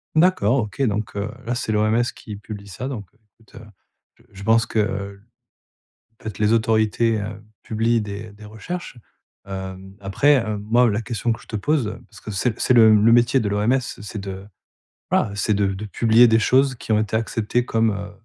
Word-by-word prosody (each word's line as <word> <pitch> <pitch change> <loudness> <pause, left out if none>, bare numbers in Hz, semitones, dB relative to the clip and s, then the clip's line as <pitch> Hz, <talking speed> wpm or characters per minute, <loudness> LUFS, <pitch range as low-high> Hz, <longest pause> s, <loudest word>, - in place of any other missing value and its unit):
D'accord, 155 - +3
OK, 105 +1 -3
donc 105 -4 -1
heu, 100 +1 -3
là 120 +1 -1
c'est 110 - -2
l'OMS 110 +2 +2
qui 105 - -9
publie 105 -1 -9
ça 125 +8 -6
donc, 105 -7 -6
heu, - - -31 0.2
écoute, 115 - -22
heu, - - -13 0.5
je 115 - -24
je 100 0 -10
pense 115 +1 +3
qu'en 110 -2 0 1.4
fait, 110 -4 -7
les 105 +1 +2
autorités, 110 0 +2
heu, 105 0 -6 0.2
publient 115 +1 0
des 105 +1 -7
des 105 +1 -14
recherches, 120 +8 -7 0.5
hem. 95 0 -7
Après, 100 +10 +3
hem, 110 -5 0
moi, 120 +3 +3
la 105 - -1
question 115 +1 -2
que 110 - -6
je - - -17
te 110 - -5
pose, 125 -2 -1
parce 100 - -15
que 110 - -8
c'est 110 +4 -1
c'est 125 - +3
le 110 -2 +7
le 105 +2 +5
métier 120 +3 +4
de 105 - -1
l'OMS 105 +6 +1
c'est 105 -3 -7
de, 95 0 -7 0.7
bah, 100 - +2
c'est 105 +1 0
de 100 -1 +1
de 105 - -6
publier 115 +3 +4
des 110 0 +4
choses 130 +3 +3
qui 120 - -7
ont 105 - +4
été 110 0 -2
acceptées 115 +2 -1
comme, 115 -1 +1
heu, 100 0 -6
110 Hz, 195 wpm, -22 LUFS, 105-115 Hz, 1.4 s, le